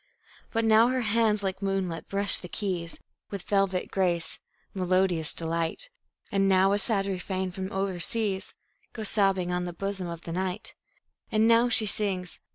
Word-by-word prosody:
But 225 -1 0
now 225 +1 +6
her 255 0 0
hands 220 -2 +2
like 190 0 -3
moonlight 195 -4 -2
brush 200 0 +3
the 180 - -8
keys 180 -3 -4 0.3
With 200 -3 -6
velvet 195 -2 0
grace 175 -4 -1 0.3
melodious 185 -3 +2
delight; 165 - -2 0.4
And 195 -1 +2
now 190 0 +4
a 205 - +2
sad 200 -2 +1
refrain 190 -1 -3
from 190 +2 -5
over 190 -2 -2
seas 205 0 0 0.4
Goes 220 -3 +1
sobbing 195 -4 +2
on 180 0 -1
the 175 - -5
bosom 195 0 -4
of 170 -1 -7
the 165 - -7
night; 185 +3 -3 0.6
And 220 +1 +3
now 230 +1 +4
she 225 -2 +5
sings. 195 -4 0
195 Hz, 165 wpm, -27 LUFS, 180-210 Hz, 0.6 s, now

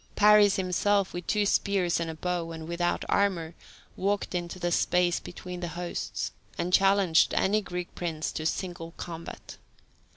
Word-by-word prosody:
Paris 210 -1 +6
himself, 195 +2 +1
with 175 -1 -6
two 210 -1 +2
spears 195 -4 +1
and 165 -1 -2
a 160 - -5
bow, 175 0 -2
and 160 -1 -7
without 175 +1 -1
armour, 175 -5 +1 0.4
walked 200 +1 -1
into 175 0 -3
the 175 -1 -1
space 175 0 +2
between 180 0 -8
the 175 - -3
hosts, 175 -1 -3 0.3
and 180 +1 -2
challenged 195 -4 +4
any 210 +3 +2
Greek 180 -3 -6
prince 160 -3 -3
to 155 - -4
single 175 -2 -4
combat. 170 -1 -8
180 Hz, 155 wpm, -28 LUFS, 170-195 Hz, 0.4 s, Paris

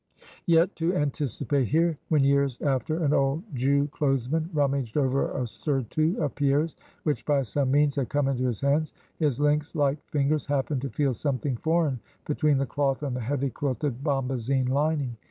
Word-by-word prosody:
Yet 170 +1 +4
to 170 +2 0
anticipate 140 - 0
here 165 +4 +2
when 150 -3 +3
years 140 -2 +2
after, 155 +4 0
an 145 -1 +2
old 140 +4 +1
Jew 140 +3 +2
Clothesman 145 +2 0
rummaged 140 -6 0
over 135 -1 +1
a 130 - -2
surtout 145 - -1
of 145 - -1
Pierre's 145 +2 +1 0.3
which 150 -2 -1
by 145 -2 +2
some 130 +4 -1
means 145 +1 +3
had 135 -3 -1
come 145 -1 +1
into 130 -2 0
his 120 -5 -2
hands 145 +2 +1 0.3
his 145 -6 +1
lynx 150 +2 +1
like 145 -1 +1
fingers 145 0 0
happened 140 -1 0
to 135 - -3
feel 140 -2 0
something 135 +1 -2
foreign 160 -1 +1 0.3
between 150 -1 +2
the 135 - +1
cloth 135 +2 -1
and 135 -4 -2
the - - -2
heavy 135 +3 -1
quilted 135 0 -2
bombazine 130 -2 0
lining. 140 -3 0
140 Hz, 175 wpm, -26 LUFS, 135-150 Hz, 0.3 s, Yet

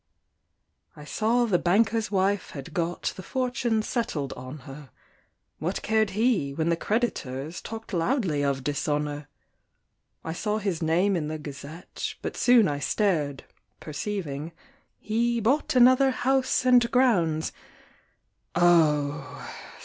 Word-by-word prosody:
I 150 - -11
saw 230 +9 +1
the 190 -6 +2
banker's 220 +4 +2
wife 195 0 0
had 135 -3 -9
got 175 -2 -2
The - - -7
fortune 245 -1 -1
settled 160 - -2
on 130 +3 -9
her; 135 0 -10 0.7
What 175 +5 -3
cared 220 -1 +2
he, 215 - +1
when 160 +2 0
the 170 - +3
creditors 165 - -2
Talked 225 -1 -8
loudly 175 - 0
of 140 -2 0
dishonour! 145 0 -2 1.0
I 160 - -4
saw 210 +4 -1
his 195 -6 -2
name 175 +5 +2
in 155 -4 -2
the 155 +1 -3
Gazette, 150 +3 -7
But - - -4
soon 245 -5 +5
I 145 -1 -2
stared, 150 -7 0 0.4
perceiving, 155 -2 -4 0.4
He 235 +2 0
bought 275 +6 +1
another 255 +2 +6
house 260 0 +1
and 245 -2 +5
grounds: 180 -12 +2 1.0
Oh! 150 -4 +2
175 Hz, 125 wpm, -26 LUFS, 150-225 Hz, 1.0 s, another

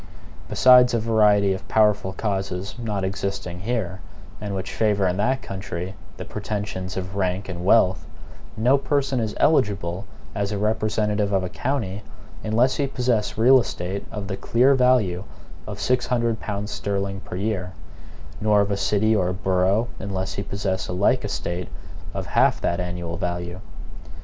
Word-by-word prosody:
Besides 125 -1 +6
a - - +2
variety 105 -3 +3
of 95 - -7
powerful 105 -3 +3
causes 95 -2 -3
not 105 -4 -2
existing 95 -2 -3
here, 100 -4 -2 0.4
and 100 -2 -3
which 95 - -4
favor 105 -3 +2
in 90 +1 0
that 130 +6 0
country 95 -1 -5 0.2
the - - -6
pretensions 100 -3 -4
of 95 +1 -4
rank 95 0 -1
and 90 -2 -5
wealth, 95 -1 +3 0.5
no 125 +5 +4
person 135 -2 0
is 110 -2 -2
eligible 100 - +1 0.3
as 100 -1 -2
a 105 - -1
representative 105 -1 0
of 95 -2 +1
a 90 - -3
county, 110 -7 -2 0.4
unless 120 +5 +2
he 140 - +1
possess 125 -6 0
real 130 +4 +7
estate 95 -4 -4
of 105 -3 -5
the 95 -1 -3
clear 125 +4 +3
value 125 -9 +3 0.4
of 105 -1 -6
six 125 +3 +1
hundred 115 -3 0
pounds 105 0 -4
sterling 100 -1 -2
per 95 - -8
year; 95 -2 -2 0.7
nor 105 -1 +4
of 100 0 0
a 100 - 0
city 110 +2 +2
or 90 -3 +1
borough, 95 +4 +1
unless 95 -2 -3
he - - -3
possess 100 -1 -2
a - - -4
like 95 +3 +2
estate 90 +1 -3 0.5
of - - -3
half - - +3
that 85 - -1
annual 90 -1 -4
value. 85 0 -3
100 Hz, 160 wpm, -23 LUFS, 95-110 Hz, 0.7 s, real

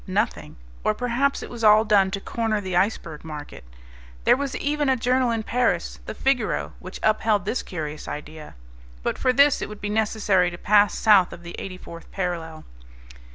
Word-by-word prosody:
Nothing; - - -2 0.3
or 215 - +1
perhaps 250 +4 0
it - - -8
was 235 -1 -7
all 215 +1 +6
done 200 -3 +4
to 195 +1 -3
corner 220 +1 -1
the 190 -3 -4
iceberg 180 -5 -1
market. 150 -2 -8 0.6
There - - +5
was 275 +1 -3
even 295 -1 0
a 265 - +4
journal 250 +1 +1
in 225 -1 -1
Paris, 135 - 0
the - - -5
Figaro, 265 -5 0
which 185 +1 -9
upheld 215 -1 +2
this 235 +5 -1
curious 155 -4 -6
idea. 150 +1 -8 0.5
But - - -2
for 255 - +3
this 280 +2 +4
it - - -4
would 210 -1 -9
be 205 - -4
necessary 210 -4 +2
to 175 - -8
pass 205 +1 +3
south 205 -5 +5
of 175 - -11
the 170 0 -8
eighty 185 -1 -6
fourth 170 -2 -11
parallel. 170 -4 -4
210 Hz, 185 wpm, -24 LUFS, 175-235 Hz, 0.6 s, all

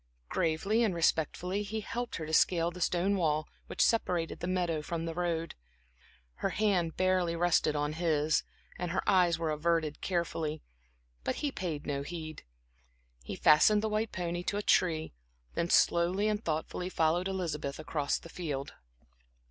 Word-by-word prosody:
Gravely 195 +8 +1
and 205 -6 +1
respectfully 170 +4 0
he 215 +2 -3
helped 240 +3 -4
her 160 - -4
to 160 - -6
scale 170 +1 +3
the 180 +1 -9
stone 180 +4 +2
wall, 155 -3 +1 0.2
which - - +1
separated 180 -7 0
the 175 - -3
meadow 175 -4 0
from 165 +2 -4
the 165 - -3
road. 170 -1 -2 0.8
Her - - -1
hand 185 -6 +1
barely 185 -2 +2
rested 170 -3 +2
on 150 +1 -1
his, 155 -2 +1 0.4
and 180 -1 -2
her 185 +3 -2
eyes 180 -4 +4
were 165 -1 -1
averted 155 0 0
carefully, 165 -4 -2 0.6
but - - -1
he 290 - -2
paid 165 - -4
no 140 -2 -2
heed. 155 +1 -6 0.8
He - - -5
fastened 205 +8 +5
the 220 - 0
white 215 +1 -1
pony 175 -1 -3
to 205 - -1
a 205 - -2
tree, 160 -6 +2 0.4
then 170 - -1
slowly 180 +5 +3
and 215 +1 -1
thoughtfully 160 +3 -2
followed 170 +1 +1
Elizabeth 160 -7 -3
across 150 -2 -1
the - - -11
field. 150 -5 -4
170 Hz, 160 wpm, -31 LUFS, 155-185 Hz, 0.8 s, fastened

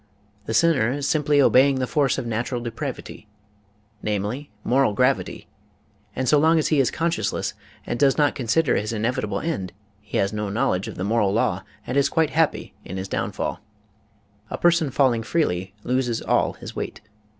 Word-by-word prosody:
The 110 - -1
sinner 130 -4 +3
is 140 0 -2
simply 150 -1 +2
obeying 135 0 +5
the 130 -1 0
force 140 -1 +1
of - - -3
natural 120 +2 -2
depravity, 120 -2 -6 0.7
namely, 105 +7 -3
moral 130 -3 +2
gravity, 130 +5 0 0.7
and 130 0 -2
so 150 - +5
long 160 +2 +4
as 155 - +1
he 155 - +3
is 130 - +3
conscienceless 170 +1 -1 0.3
and 120 - -3
does 135 -1 +4
not 145 -2 +3
consider 130 +4 +1
his 105 +2 -2
inevitable 105 -2 -1
end 135 - -3 0.3
he 105 - -4
has 100 +2 +1
no 105 -1 -2
knowledge 100 -2 0
of - - -7
the 90 - -4
moral 105 -1 +2
law 110 - +1 0.2
and 125 - -2
is 140 - +3
quite 160 -2 +1
happy 160 -1 0
in 95 - -7
his 95 +1 -4
down - - -2
fall. - - -3 0.9
A - - -4
person 170 -3 +3
falling 125 -3 +2
freely 95 - -1
loses 125 -2 0
all - - +1
his - - -10
weight. - - -5
125 Hz, 175 wpm, -23 LUFS, 110-145 Hz, 0.9 s, obeying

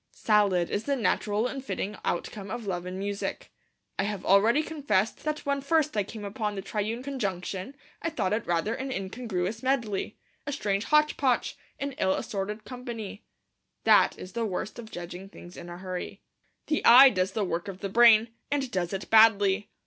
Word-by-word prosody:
Salad 200 -5 +2
is 205 - -2
the 280 - +1
natural 210 -1 0
and 265 +1 -4
fitting 210 -5 -3
outcome 195 +3 -3
of 235 +2 -5
Love 180 -2 -3
and 185 +1 -5
Music. 200 +1 -4 0.5
I - - +3
have 205 -2 -4
already 220 +10 +4
confessed 245 -11 -1
that 305 0 -2
when 280 0 0
first 305 0 +1
I 210 - +2
came 205 +1 -7
upon 210 0 -3
the 195 - -5
triune 220 +5 -3
conjunction 200 -4 -4 0.3
I 330 - -1
thought 210 - -1
it 220 - -2
rather 175 +6 0
an 265 +2 -4
incongruous 200 -1 -3
medley, 235 -7 -1 0.3
a - - -1
strange 205 -5 -1
hotch 300 0 +3
potch, 260 -4 +1 0.2
an 280 0 -2
ill 190 0 +2
assorted 210 +2 -4
company. 235 -5 -7 0.6
That - - +5
is 185 - -9
the 235 - -1
worst 210 +2 -4
of 225 -2 -9
judging 180 +1 -8
things 175 -2 -13
in 175 - -9
a 175 - -7
hurry. 185 -1 -6 0.4
The 305 - -1
eye 260 +3 +9
does 185 0 -1
the 215 -3 0
work 170 0 -3
of 190 -1 -7
the 200 - -2
brain, 230 +1 +6 0.2
and 275 -3 -1
does 180 -2 -2
it 195 - -4
badly. 205 -2 +5
210 Hz, 185 wpm, -28 LUFS, 190-250 Hz, 0.6 s, eye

